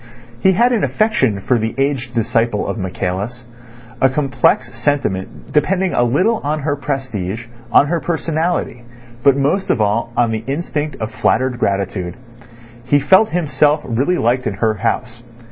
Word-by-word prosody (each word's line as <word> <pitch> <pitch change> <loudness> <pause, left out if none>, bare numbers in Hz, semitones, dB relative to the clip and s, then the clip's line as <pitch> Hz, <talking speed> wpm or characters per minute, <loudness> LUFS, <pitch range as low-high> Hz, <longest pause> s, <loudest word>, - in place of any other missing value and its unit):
He 190 +9 +4
had 240 +6 +3
an 225 - +1
affection 135 - +1
for 125 +3 +1
the 110 +1 -2
aged 135 -3 -1
disciple 115 -2 0
of - - -3
Michaelis, 95 +6 -4 0.6
a 135 - +5
complex 135 0 +1
sentiment 120 -11 -2
depending 180 +5 +1
a - - +2
little 180 - +2
on 150 +1 -1
her 145 0 0
prestige, 120 -7 -4 0.3
on - - +6
her 170 +3 0
personality, 160 -4 -2 0.4
but 140 +1 +4
most 145 +8 0
of - - +2
all 110 +3 0
on 120 -2 +3
the 110 0 -3
instinct 150 0 -3
of 110 -2 -5
flattered 130 0 0
gratitude. 95 -2 -1 0.7
He 145 +3 +3
felt 190 +10 +4
himself 150 -3 +2
really 135 +10 0
liked 125 +1 +1
in 100 - -2
her 110 +2 +1
house. 115 +2 -2
130 Hz, 155 wpm, -18 LUFS, 115-150 Hz, 0.7 s, on